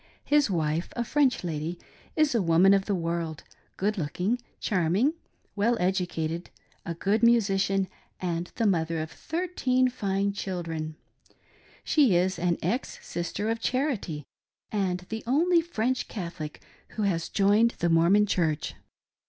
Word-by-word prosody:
His 290 -4 +3
wife, 160 -2 0
a 240 - 0
French 275 -1 +2
lady, 165 0 -3 0.4
is 310 -3 +3
a 230 - +2
woman 175 +3 +5
of 195 -1 +2
the 205 - 0
world 165 -2 -3 0.2
— - - -39
good 210 +1 0
looking, 180 +10 -1 0.2
ikarra 180 -4 +1
ing, 275 +8 +3 0.4
well 230 +4 +2
educated, 175 -2 -1 0.4
a 170 - -3
good 200 +6 +1
musician, 195 -4 +3 0.3
and 175 -1 -3
the 230 - 0
mother 165 -4 +1
of 155 +1 -4
thirteen 270 -7 0
fine 200 -4 -1
children. 165 -5 -4 0.9
She 275 - +4
is 180 0 +1
an 175 0 +1
ex 250 +4 -1
Sister 175 +5 -3
of 225 - -2
Charity, 245 - -1 0.5
and 185 -4 0
the 220 0 -4
only 335 +7 +4
French 255 -6 -1
Catholic 170 -6 -6 0.3
who 215 - 0
has 170 -5 0
joined 210 +4 +3
the 170 - +1
"Mormon 170 +5 +5
Church." 160 -6 0
195 Hz, 145 wpm, -27 LUFS, 170-230 Hz, 0.9 s, woman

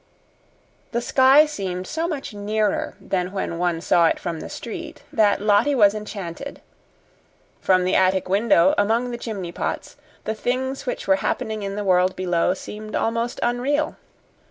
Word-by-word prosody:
The 235 - +1
sky 265 +4 +6
seemed 190 -10 -4
so 325 - -2
much 295 -9 -5
nearer 210 0 -1
than 180 -1 -2
when 190 -4 -3
one 175 -2 0
saw 170 -1 +4
it - - +1
from 170 -2 -4
the - - -7
street, 315 +6 -7
that 210 -2 +3
Lottie 215 +7 +3
was 205 -5 +5
enchanted. 210 +3 -7 1.0
From 185 -1 +3
the 185 - 0
attic 190 0 +2
window, 195 -2 +4
among 230 +4 +1
the 240 - -4
chimney 200 -7 -5
pots, - - -4 0.3
the 220 - -2
things 260 - -2
which - - -3
were 290 - +4
happening 220 -6 -2
in 200 0 -4
the 210 - -3
world 185 -1 +3
below 180 0 +1
seemed 215 +2 -8
almost 230 +1 -1
unreal. 265 +5 0
210 Hz, 155 wpm, -23 LUFS, 185-245 Hz, 1.0 s, sky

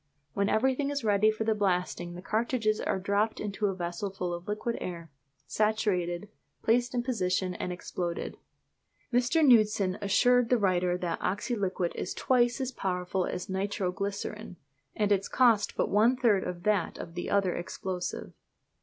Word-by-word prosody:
When 200 0 +1
everything 265 +5 +1
is 285 -2 -2
ready 210 0 +4
for 215 0 -1
the 220 0 +2
blasting 180 -3 -1
the 180 - -9
cartridges 220 0 0
are - - 0
dropped 200 +3 0
into 205 0 -1
a 195 - -1
vessel 175 +2 -3
full 180 -2 -4
of 175 +1 -7
liquid 215 +3 -2
air, 170 -3 -6 0.3
saturated, 205 -4 0 0.4
placed 240 +2 +2
in 240 - 0
position, 185 -6 0
and 180 - -4
exploded. 175 -1 -4 0.8
Mr. 250 +6 +3
Knudsen 210 -6 +4
assured 245 +4 +3
the 250 - +4
writer 180 -3 +1
that 175 -2 -3
oxyliquit 195 -3 -1
is - - -4
twice 245 -1 +2
as 265 -1 -2
powerful 180 -3 -2
as 180 - -4
nitro 190 -1 -1
glycerine, 200 +2 -5 0.4
and 210 -1 +1
its 195 -1 +2
cost 230 -5 +3
but - - +2
one 225 +5 +3
third 220 -7 +3
of 175 -1 -5
that 205 -5 +1
of 165 - -8
the 175 0 -4
other 195 -3 +2
explosive. 180 +1 -5
200 Hz, 160 wpm, -29 LUFS, 180-225 Hz, 0.8 s, ready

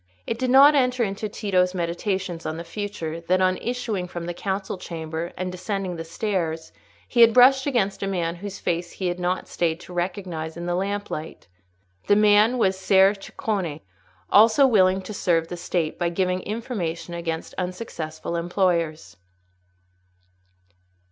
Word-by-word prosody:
It 230 - -3
did 255 - 0
not 275 +3 +8
enter 250 -3 +2
into 205 +1 -3
Tito's 185 -3 0
meditations 175 0 -2
on 160 - -4
the 170 - -5
future, 170 -3 -5
that, 180 +2 +1
on 185 0 +2
issuing 230 -6 -3
from 175 -1 -6
the 175 - -3
council 190 +1 -3
chamber 165 0 -5
and 185 0 -3
descending 185 0 -3
the 165 - -5
stairs, 165 -3 -3 0.4
he 240 - +2
had 230 -1 +7
brushed 265 +2 +6
against 200 -8 0
a 195 - -1
man 175 -3 -2
whose 200 +2 -7
face 175 0 -2
he 185 -2 -2
had 175 +1 -4
not 180 +1 -1
stayed 165 -1 -1
to 180 - -11
recognise 175 -3 -4
in 170 - -5
the 175 - -1
lamplight. 195 - -4 0.6
The 205 - +5
man 210 +3 +5
was 190 -5 +1
Ser 195 +1 +5
Ceccone—also 195 - +1
willing 190 -6 +3
to 215 - -7
serve 165 -4 +1
the 175 - -4
State 170 -2 -2
by 175 -1 +1
giving 180 +1 0
information 200 -7 -4
against 165 -1 -4
unsuccessful 180 -4 -5
employers. 170 - -1
185 Hz, 155 wpm, -24 LUFS, 170-205 Hz, 0.6 s, not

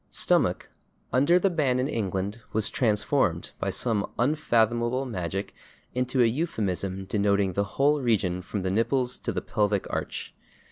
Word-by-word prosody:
/Stomach/, - - +2 0.5
under 145 +7 +5
the 190 +1 +2
ban 140 -7 +1
in 130 +1 0
England, 100 -3 -2
was 110 -1 +2
transformed, 105 - +1
by - - -1
some 110 -5 0
unfathomable 120 -2 +1
magic, 95 -3 -4 0.4
into 125 0 +1
a - - +5
euphemism 100 - -2
denoting 100 -1 +1
the 100 - +1
whole 145 +1 +3
region 95 -7 +1
from 95 +1 -4
the 95 - -1
nipples 125 +4 +1
to - - -3
the - - -3
pelvic 105 -2 0
arch. - - -4
115 Hz, 145 wpm, -26 LUFS, 100-130 Hz, 0.5 s, under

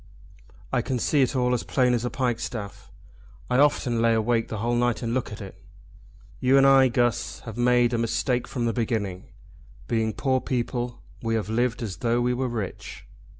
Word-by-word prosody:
I 125 - +3
can 130 +2 -2
see 140 +5 +2
it 130 +1 +1
all 125 -1 +2
as 125 - 0
plain 125 -2 +1
as 120 -1 0
a 125 - -1
pikestaff. 120 -5 -3 0.6
I 125 - +3
often 130 -5 +2
lay 115 0 +3
awake 115 +1 +1
the 110 - -5
whole 120 +3 -1
night 120 0 +1
and 115 0 -1
look 130 -3 -2
at 105 - -8
it. 95 -2 -11 0.8
You 130 +2 +4
and 135 - +6
I, 135 -1 +6
Guss, 120 -2 0
have 115 - -8
made 120 0 +3
a 115 - +1
mistake 120 +2 0
from 120 -3 -3
the 115 - 0
beginning. 110 -6 -2 0.6
Being 110 -2 0
poor 130 -2 0
people 120 -1 -3 0.2
we 115 -1 -1
have 110 -1 -2
lived 120 +2 0
as 100 -5 -5
though 120 0 +1
we 125 0 +1
were 130 +1 -1
rich." 110 -5 -6
120 Hz, 195 wpm, -25 LUFS, 115-125 Hz, 0.8 s, and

